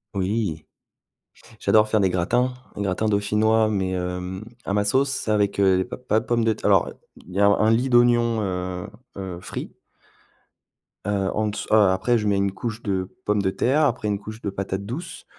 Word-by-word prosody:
Oui. 95 -4 -1 1.0
J'adore 110 0 +4
faire 110 -1 +2
des 95 - +3
gratins 120 +9 +1 0.2
gratins 100 +1 -1
dauphinois 110 +2 +2
mais 95 -3 -1
hem, 90 +1 -4 0.2
à 100 - -2
ma 105 0 +2
sauce. 135 +6 +2
C'est 120 -5 -2
avec, 105 -2 +1
heu, 95 -1 +3
p - - -4
pas 125 -3 +1
de 115 - -10
pommes 120 0 +1
de 115 - +3
terr - - -10
alors, - - +4
heu, - - -10 0.3
il 90 - -12
y 95 - -2
a 100 - +5
un 110 +2 +4
lit 125 +4 +2
d'oignons, 120 -2 +4
heu 90 -2 -3 0.3
heu, 95 -3 -6
frits. - - -7 1.3
Heu, 100 -2 0
en 110 0 0
dess 105 - -4
heu, - - +6 0.2
après 95 +6 +1
je 105 -2 -1
mets 100 -1 +2
une 100 0 +1
couche 115 +3 -5
de 95 -3 -2 0.2
pommes 105 0 +1
de 95 - +1
terre, 135 +10 +1
après 115 -5 -1
une 100 -1 -1
couche 110 +2 -9
de 100 - -2
patates 95 0 -4
douces, 160 - -7
105 Hz, 200 wpm, -23 LUFS, 95-115 Hz, 1.3 s, heu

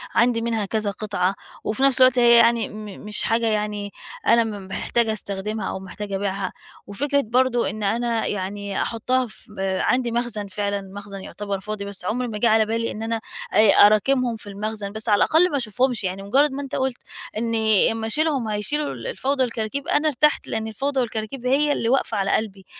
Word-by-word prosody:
عندي 235 0 +3
منها 225 -2 -1
كذا 215 0 0
قطعة 195 -2 -1 0.3
وفي 220 +5 -1
نَفْس 275 -1 +4
الوقت 255 -1 +6
هي 235 -1 +7
يعني 235 -1 +3
م 215 0 -8 0.2
مش 210 0 -2
حاجة 230 +1 +1
يعني 210 -1 -1 0.4
أنا 235 0 +6
م 205 -4 -6
محتاجة 225 +3 0
أستخدمها 210 +1 -3
أو - - -4
محتاجة 195 +1 -6
أبيعها. 195 -1 -2 0.3
وفكرة 280 +8 0
برضه 245 0 +1
إن 215 0 -5
أنا 230 +2 0
يعني 200 0 -3
أحُطّها 250 +3 0
في 210 -1 -13
آآ 190 -1 0
عندي 250 -2 +1
مخزن 230 -3 -2
فعلًا 200 +1 -2
مخزن 200 0 -9
يُعتبر 200 0 -5
فاضي، 205 +1 -5
بس 200 -3 -5
عُمْر 245 +5 -1
ما 215 -3 -4
جِه 235 - +2
على 220 0 +4
بالي 230 +1 -1
إن 215 - -6
أنا 225 0 -2 0.3
آآ 215 0 +6
أراكمهم 235 +4 +4
في 215 - -10
المخزن، 205 0 -4
بس 220 +2 0
على 205 - +5
الأقل 335 - +4
ما 285 - +1
أشوفهمش 245 0 0
يعني 190 +1 -3
مُجرّد 275 +9 +3
ما 275 +1 -4
أنت 275 - -5
قُلت 260 -2 -1 0.4
إنّي 220 -2 +2
أمّا 225 0 -3
أشيلهم، 290 -1 0
هيشيلوا 280 +8 -1
ال - - -7
الفوضى 280 - 0
والكراكيب، 235 +5 -3
أنا 295 +1 +2
ارتحت 300 +1 +2
لإن 220 0 -3
الفوضى 270 +5 -2
والكراكيب 235 +1 -3
هي 290 +3 +3
اللي 230 -5 0
واقفة 265 -3 +1
على 195 0 0
قلبي. 200 -3 -3
220 Hz, 190 wpm, -23 LUFS, 205-250 Hz, 0.4 s, هي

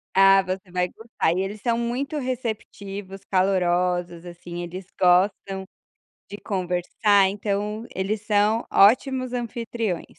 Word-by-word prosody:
Ah, 195 0 +7
você 185 0 -5
vai 180 0 0
gostar 225 -7 -2
e 185 - 0
eles 200 +2 -5
são 235 -1 +1
muito 255 +6 -2
receptivos, 205 -6 -5
calorosos, 180 -2 +1
assim, 175 0 -7
eles 180 +2 -7
gostam 190 +1 +2 0.6
de 205 - -7
conversar, 190 +1 +1
então 210 +2 -3
eles 200 +3 -2
são 210 +2 +2
ótimos 255 +4 +4
anfitriões. 230 -5 -3
195 Hz, 120 wpm, -24 LUFS, 180-225 Hz, 0.6 s, Ah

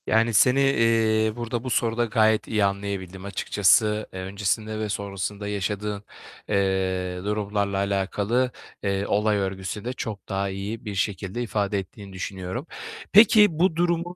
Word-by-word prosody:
Yani, 115 +1 +3
seni, 125 +5 +5
eee, 115 -4 +3
burada, 120 0 -3
bu 130 - -4
soruda 115 0 +1
gayet 110 -1 +2
iyi 105 -2 +2
anlayabildim 100 -1 -4
açıkçası. 105 +2 +2
Eee, 95 - -6
öncesinde 105 +3 -2
ve 110 -1 -2
sonrasında 100 0 -4
yaşadığın, 105 0 -3 0.5
eee, 95 -2 0
durumlarla 100 -1 -1
alakalı, 100 +5 0 0.3
eee, 100 0 0
olay 105 +1 +2
örgüsü 95 +1 -4
de 125 - -2
çok 110 -5 -6
daha 100 -1 -1
iyi 100 +4 -5
bir 105 -2 -4
şekilde 95 +3 -2
ifade 105 -3 -1
ettiğini 95 +1 -10
düşünüyorum. 95 - -5 0.4
Peki 210 -4 +7
bu 180 -1 +3
durumun 175 +1 0
105 Hz, 140 wpm, -25 LUFS, 100-115 Hz, 0.5 s, Peki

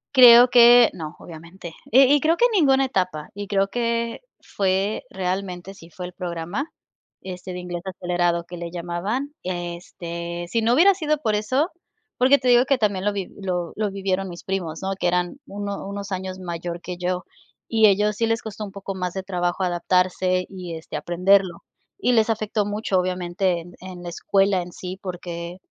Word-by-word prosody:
Creo 245 -1 +10
que 240 0 +8
no, 155 -2 -7
obviamente. 170 +1 -11 0.2
Y 260 +4 +8
y 290 - +5
creo 325 +4 +2
que 480 - +4
en - - +2
ninguna 270 -9 +4
etapa. 185 - -2
Y 205 0 -6
creo 195 -1 +1
que 235 - -1 0.2
fue, 195 +1 -1
realmente, 185 0 -4
sí 165 -3 -15
fue 180 +2 -7
el 180 - -8
programa, 175 - -4 0.5
este, 185 0 -7
de 180 - -5
inglés 175 -1 -5
acelerado 175 -2 -1
que 175 +1 -9
le 170 0 -5
llamaban. 180 +11 -3
Este, 175 -1 -5
si 230 - +1
no 230 +2 +3
hubiera 380 +7 +6
sido 305 -5 0
por 225 -7 -1
eso 260 - 0 0.5
porque 265 +3 +6
te 255 - -3
digo 245 0 +6
que 275 0 +2
también 205 -5 0
lo 210 - +3
vi 200 -2 -4
lo 180 -3 -2
lo 215 -1 -1
vivieron 195 -1 -2
mis 175 -1 -9
primos, 175 -5 -3
¿no?, 190 - -1
que 180 - +1
eran 180 +7 0
uno 200 0 -5
unos 200 0 -6
años 185 0 -4
mayor 175 -1 -5
que 180 0 -6
yo, 180 0 -2 0.4
y 220 -1 +5
ellos 210 +1 +2
sí 230 +2 0
les 225 0 0
costó 215 -1 -6
un 200 - -9
poco 195 0 -6
más 180 -1 -3
de 190 - -4
trabajo 180 -1 -1
adaptarse 180 +1 +1
y, 180 -3 -7
este, 160 - -9
aprenderlo. 180 +3 +2 0.3
Y 385 -10 +1
les 225 -2 +3
afectó 215 -1 0
mucho, 205 -2 0
obviamente, 180 0 -1
en 175 +1 -13
en 180 -1 -9
la 175 - -5
escuela 195 +2 +1
en 175 0 -8
sí 185 +2 -7
porque, 175 -1 -6
190 Hz, 190 wpm, -23 LUFS, 175-215 Hz, 0.5 s, Creo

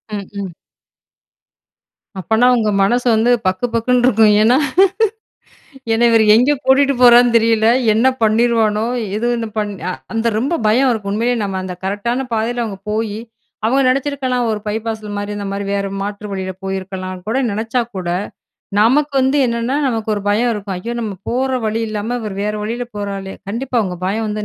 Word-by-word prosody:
ம் 200 -2 -6 0.2
ம். - - -4 1.7
அப்பன்னா 220 +6 +2
உங்க 220 -3 +1
மனசு 245 +5 +1
வந்து 230 +3 +3 0.2
பக்கு, 185 +5 0
பக்குன்னு 245 +2 +2
இருக்கும். 220 -3 +4
ஏன்னா 235 +4 +4 1.4
ஏன்னா 225 +1 +2
இவரு 225 -1 +4
எங்கே 255 +6 +3
கூட்டிட்டு 275 +1 +4
போறான்னு 240 0 +7
தெரியல. 225 -1 +3 0.3
என்ன 230 +4 +3 0.2
பண்ணிருவானோ! 220 -1 +2 0.3
எது 230 +3 -1
என்னு 230 -1 -3
பண் 210 -1 -1 0.2
அ - - -2 0.2
அந்த 225 +1 -1
ரொம்ப 270 +9 -1
பயம் 250 +5 +3
இருக்கும் 210 -4 -2
உண்மையிலயே 235 +3 0
நம்ம 195 -1 -3
அந்த 185 -1 -5
கரெக்டான 235 +7 -2
பாதைல 235 +2 -1
அவுங்க 200 -4 -6
போயி 215 -1 -2 0.5
அவங்க 265 +4 +2
நெனைச்சிருக்கலாம் 260 -2 0
ஒரு 215 -1 -2
பைபாஸ்ல 220 0 -4
மாரி 205 0 -4
இந்த 205 -1 -5
மாரி 200 +1 -3
வேற 200 0 -1 0.2
மாற்று 205 +1 -5
வழியில 190 -1 -4
போயிருக்கலான்னு 185 -1 -5
கூட 225 +5 0
நெனைச்சா 225 +4 -1 0.2
கூட, 180 -2 -3 0.7
நமக்கு 280 +6 +3
வந்து 265 +2 +2
என்னென்னா, 235 +3 -1
நமக்கு 225 -4 -2
ஒரு 205 - -4
பயம் 235 +4 +2
இருக்கும். 200 -3 -5
ஐயோ! 230 +6 -5
நம்ம 215 -3 -3 0.2
போற 260 +2 0 0.2
வழி 220 +1 -1
இல்லாம 215 +3 -3
இவரு 210 -3 -5
வேற 210 0 -1
வழில 235 +3 -3
போறாரே. 195 -1 -5
கண்டிப்பா 245 +5 -3
உங்க 180 -2 -4
பயம் 220 +3 -1
வந்து 210 0 -3
220 Hz, 165 wpm, -17 LUFS, 205-245 Hz, 1.7 s, போறான்னு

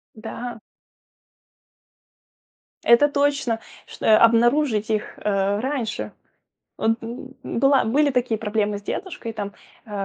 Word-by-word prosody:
Да. 230 +1 -7 2.2
Это 260 +5 +6
точно, 280 -5 +1 0.3
чт - - -14
Обнаружить 230 +1 +4
их, 215 -1 -2
э, 200 0 0
раньше. 255 -3 -3 0.7
Вот 225 - +2
б 245 +3 -8
была 275 +2 +3
были 285 +6 +3
такие 245 -3 0
проблемы 210 -1 -1
с - - -10
дедушкой 285 - -5
там. 200 -1 -5 0.3
Э, 210 - -14
230 Hz, 105 wpm, -23 LUFS, 215-270 Hz, 2.2 s, Это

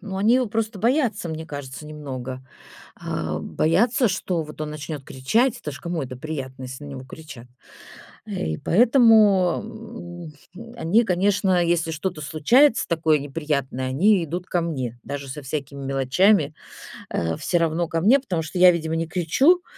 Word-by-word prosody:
Ну, 195 -3 -6
они 215 +5 +3
его 255 -1 +2
просто 220 0 -2
боятся, 235 - +1
мне 160 0 -5
кажется, 145 0 -8
немного. 130 -4 -7 0.5
А, - - -3
боятся, 225 - +2
что 175 -4 -1
вот 150 0 -11
он 150 - -3
начнёт 150 -2 -6
кричать. 230 - +1
Это 150 - -5
ж 145 - -9
кому 170 -2 -3
это 130 -1 -7
приятно, 130 -3 -6
если 130 +2 -8
на - - -8
него 130 -2 -8
кричат. 130 -3 -11 0.8
И 80 0 -3
поэтому, 215 - +2 0.3
м, 235 +2 -11
они, 220 +4 +2
конечно, 190 -1 +2
если 170 -1 0
что-то 165 +1 -4
случается 225 - +3
такое 160 -2 +2
неприятное, 140 -3 -3
они 185 +8 +3
идут 170 +3 -4
ко 175 - 0
мне. 130 -8 -4
Даже 140 -1 -6
со 150 +3 -6
всякими 140 0 -5
мелочами, 140 +5 +2 0.6
а, 80 -1 -2
всё 175 - 0
равно 165 +1 0
ко 165 0 -2
мне, 235 +10 +5
потому 185 -11 -3
что 165 +3 -5
я, 180 0 +9
видимо, 160 -2 -2
не 165 - -2
кричу, 260 - +3
165 Hz, 160 wpm, -23 LUFS, 145-205 Hz, 0.8 s, я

